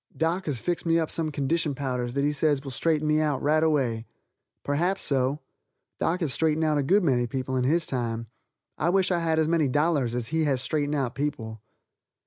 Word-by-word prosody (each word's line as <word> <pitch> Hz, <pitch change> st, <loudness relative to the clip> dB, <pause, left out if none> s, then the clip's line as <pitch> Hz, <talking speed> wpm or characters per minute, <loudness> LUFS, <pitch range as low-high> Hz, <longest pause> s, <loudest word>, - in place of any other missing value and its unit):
Doc 170 Hz, +3 st, -1 dB
has 135 Hz, -6 st, -1 dB
fixed 175 Hz, -1 st, -1 dB
me 165 Hz, -1 st, +2 dB
up 160 Hz, -2 st, -1 dB
some 160 Hz, -2 st, -1 dB
condition 145 Hz, +1 st, 0 dB
powders 125 Hz, -3 st, -3 dB
that 140 Hz, +1 st, 0 dB
he 145 Hz, -, +2 dB
says 145 Hz, -1 st, +1 dB
will 135 Hz, -, -6 dB
straighten 155 Hz, +3 st, 0 dB
me 155 Hz, 0 st, +3 dB
out 150 Hz, -4 st, 0 dB
right 155 Hz, +2 st, +2 dB
away. 130 Hz, -8 st, 0 dB, 0.6 s
Perhaps 175 Hz, +7 st, 0 dB
so. 135 Hz, +1 st, +1 dB, 0.6 s
Doc 180 Hz, +3 st, 0 dB
has 150 Hz, -6 st, 0 dB
straightened 160 Hz, +1 st, +1 dB
out 155 Hz, -2 st, +2 dB
a -, -, +2 dB
good 190 Hz, +9 st, +3 dB
many 125 Hz, -6 st, +2 dB
people 130 Hz, +2 st, -3 dB
in 125 Hz, -1 st, +1 dB
his 165 Hz, +4 st, +2 dB
time. 115 Hz, -4 st, -3 dB, 0.5 s
I 165 Hz, -, +1 dB
wish 190 Hz, +1 st, +2 dB
I 175 Hz, -, +2 dB
had 165 Hz, -1 st, 0 dB
as 160 Hz, -1 st, +2 dB
many 160 Hz, -3 st, +2 dB
dollars 145 Hz, -3 st, +1 dB
as 120 Hz, -2 st, -3 dB
he 160 Hz, 0 st, +1 dB
has 135 Hz, -3 st, +1 dB
straightened 145 Hz, +2 st, -1 dB
out 130 Hz, -4 st, -1 dB
people. 115 Hz, -7 st, -4 dB
150 Hz, 210 wpm, -26 LUFS, 130-160 Hz, 0.6 s, me